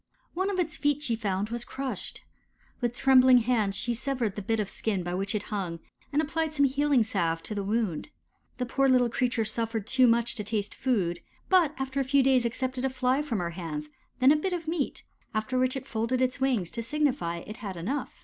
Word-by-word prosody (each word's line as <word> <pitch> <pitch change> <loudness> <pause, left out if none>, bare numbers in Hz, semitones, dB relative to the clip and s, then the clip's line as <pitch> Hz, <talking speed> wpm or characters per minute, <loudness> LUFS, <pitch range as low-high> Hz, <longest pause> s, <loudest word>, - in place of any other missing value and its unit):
One 375 +3 0
of 395 - -2
its 325 -4 -1
feet 290 0 +1
she 235 -6 0
found 205 -2 -2
was 235 +1 -3
crushed. 270 +1 -5 0.6
With 240 -1 -1
trembling 260 -1 +7
hands 225 -4 +1
she 240 - -1
severed 240 -4 -2
the 210 - -4
bit 225 +3 0
of 210 - 0
skin 195 -2 -2
by 175 0 -3
which 195 +3 -2
it 210 - -1
hung, 180 -5 -3 0.3
and 300 +2 +2
applied 315 0 -2
some 285 -1 +4
healing 280 -2 +3
salve 170 -6 -1
to - - -5
the 205 - -2
wound. 205 - -1 0.5
The 250 - -1
poor 270 +3 +2
little 250 -2 +4
creature 240 -1 0
suffered 225 -1 -2
too 260 +1 +4
much 235 0 +2
to 215 - -4
taste 210 -1 -2
food, 185 -10 0 0.3
but 345 -6 +4
after 270 +1 -2
a - - +2
few 275 +1 +3
days 260 -2 +4
accepted 255 +2 -3
a 265 - +2
Fly 260 +1 +1
from 280 -7 -2
her 175 -2 -2
hands, 155 -4 -5 0.3
then 260 +2 +6
a - - +6
bit 360 +5 -1
of 335 -2 -4
meat, 320 -3 -2 0.3
after 255 +4 0
which 255 +1 +2
it 265 - -7
folded 230 +1 -1
its 255 +1 0
wings 240 -10 +1
to 235 - -3
signify 255 - 0
it 215 - -8
had 195 -5 -6
enough. 250 +11 -2
245 Hz, 215 wpm, -28 LUFS, 210-270 Hz, 0.6 s, trembling